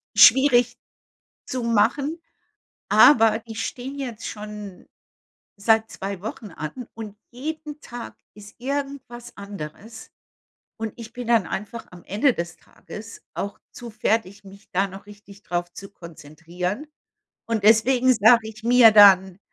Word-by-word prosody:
schwierig 245 -3 +6 0.7
zu 255 -3 -4
machen. 275 +8 +1 0.7
Aber 225 -5 +6
die 225 0 -11
stehen 260 +5 -5
jetzt 240 -5 -6
schon 210 -3 -9 0.7
seit 220 +2 +2
2 195 -1 -6
Wochen 215 0 -7
an 165 - -7
und 215 -2 -8
jeden 300 +4 -7
Tag 240 -4 -9 0.2
ist 205 0 -14
irgendwas 265 -3 -6
anderes. 200 +3 -9 0.7
Und 220 -2 -5
ich 230 -1 -10
bin 245 -1 -7
dann 230 -6 +3
einfach 210 +4 -6
am 180 -1 -14
Ende 225 +7 +1
des 170 0 -5
Tages 220 +2 -12
auch 200 0 -5
zu 240 -1 -9
fertig, 210 -2 -2
mich 200 +2 -16
da 195 +1 +1
noch 195 +1 -12
richtig 205 0 -15
drauf 175 -2 -4
zu 195 +2 -11
konzentrieren. 170 - -7 0.6
Und 225 -3 -2
deswegen 245 +4 +4
sage 220 +1 +5
ich 220 0 -12
mir 240 0 +7
dann: 190 -3 +6
220 Hz, 130 wpm, -23 LUFS, 200-240 Hz, 0.7 s, mir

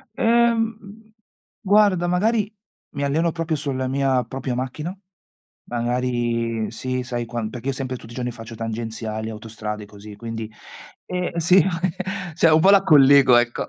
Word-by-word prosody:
Ehm, 225 -2 0 0.5
guarda, 200 -3 +3
magari 210 +4 +1 0.4
mi 140 - -2
alleno 160 +4 +1
proprio 165 -1 -2
sulla 135 -3 -3
mia 135 -1 +1
propria 125 +1 -4
macchina, 150 +9 -4 0.7
magari 120 -2 -1
sì, 130 +2 -3
sai, 120 -1 -3
quan 115 -2 -4
perché 120 +3 -8
io - - 0
sempre 130 -1 -4
tutti 115 - -13
i - - -11
giorni 125 -1 -3
faccio 115 0 -10
tangenziali, 110 -1 -4
autostrade 105 -1 -6
così, 105 +1 -12
quindi, 115 0 -6 0.6
eh 180 -1 -3
sì 180 +3 +5 0.7
Cioè, 170 -1 +4
un 155 - +6
po' 190 +5 +5
la 200 -1 +6
collego, 140 -4 +7
ecco. 120 0 0
130 Hz, 145 wpm, -22 LUFS, 115-170 Hz, 0.7 s, collego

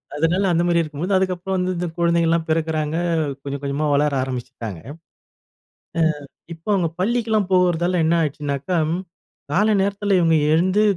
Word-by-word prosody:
அதனால 165 +6 +1
அந்த 170 0 +2
மாரி 170 -1 +3
இருக்கும்போது 160 +5 -3
அதுக்கப்பறம் 185 0 -1
வந்து 185 0 0
இந்த 175 0 -2
குழந்தைகள்ல்லாம் 170 -1 +2
பிறக்கிறாங்க 155 -1 0 0.5
கொஞ்சம், 140 0 -5
கொஞ்சமா 140 +2 -1
வளர 150 +1 +2
ஆரம்பிச்சுட்டாங்க. 120 -7 -6
அ - - -7 1.6
இப்ப 165 0 -22
அவுங்க 175 -4 +1
பள்ளிக்கலாம் 220 -1 +1
போகிறதால 180 -1 +2
என்ன 160 +2 +3
ஆயிடுனாச்சுனாக்கா, 145 +2 -2 0.2
ம் 180 +2 -2 0.5
கால 210 +7 +3
நேரத்தில 200 0 0
இவுங்க 165 -2 +3 0.2
எழுந்து 185 +5 +3
170 Hz, 135 wpm, -21 LUFS, 155-185 Hz, 1.6 s, மாரி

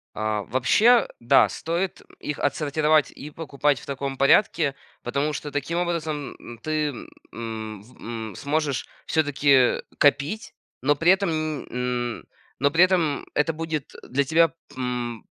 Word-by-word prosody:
А, 110 -1 -1
вообще, 220 - +4
да, 120 - +5
стоит 170 +3 -3 0.2
их 150 - -4
отсортировать, 150 +1 +2
и 150 - -9
покупать 145 -3 0
в - - -13
таком 135 -1 -4
порядке, 140 0 +3 0.3
потому 140 +5 -1
что 145 - -5
таким 145 +4 -2
образом 155 -8 -3
ты, 155 -1 0 0.4
м, 110 -2 -6 0.3
м, 110 -4 -5
сможешь 145 - -1 0.2
всё-таки 140 -4 +3 0.2
копить, 145 +8 +2 0.3
но 145 +2 +3
при 165 +5 +4
этом 195 -1 +2
ни 155 -2 -3
м 125 -1 -2 0.4
но 140 0 +3
при 170 +3 +6
этом 170 -6 +2
это 155 +2 +2
будет 160 -2 -4
для 140 +2 0
тебя, 165 +2 +4 0.2
м, 125 -2 -3
145 Hz, 135 wpm, -24 LUFS, 125-160 Hz, 0.4 s, при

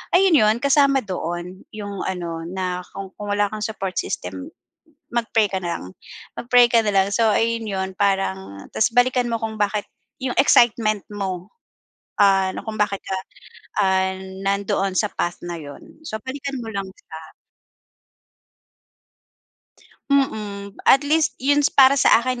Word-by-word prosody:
ayun 370 -2 +5
yun, 215 +1 +4
kasama 280 -1 +4
doon 180 0 -5
yung 205 -2 -6
ano 170 -3 -4
na 180 0 -3 0.2
kung 195 -1 -7
kung 205 -1 -4
wala 205 0 +2
kang 215 - -5
support 195 -4 -4
system, 90 +1 -5 0.6
mag-pray 225 -3 +1
ka 190 - -2
na 175 -1 -2
lang - - -10 0.5
mag-pray 245 0 +4
ka 230 - +5
na 210 - +1
lang. 195 0 +4
So, 225 -1 +3
ayun 230 +1 +1
yun, 190 -2 -3
parang 190 - -1
tas 220 - +2
balikan 245 0 +3
mo 230 - -1
kung 220 -1 -3
bakit 205 0 0 0.4
yung 255 -1 -2
excitement 215 -3 +4
mo, 190 -3 -4 0.7
ah, 195 -1 +4
na - - -4
kung 220 -1 -5
bakit 200 -1 +1
ka, 190 - -3 0.7
ah, 190 0 +2 0.3
nandoon 195 -1 0
sa 210 - +1
path 175 - -2
na 175 -1 -5
yun. 145 - -12
So, 220 - -3
balikan 275 +1 -5
mo 225 - -6
lang 195 -1 -4
sya. 160 -4 -13 2.7
Mm, 210 -8 -1
at 270 - +6
least 310 +2 +1
yun 285 +2 +2
is 290 - +3
para 270 0 +6
sa 235 - +5
akin, 255 0 -2
205 Hz, 155 wpm, -22 LUFS, 190-240 Hz, 2.7 s, at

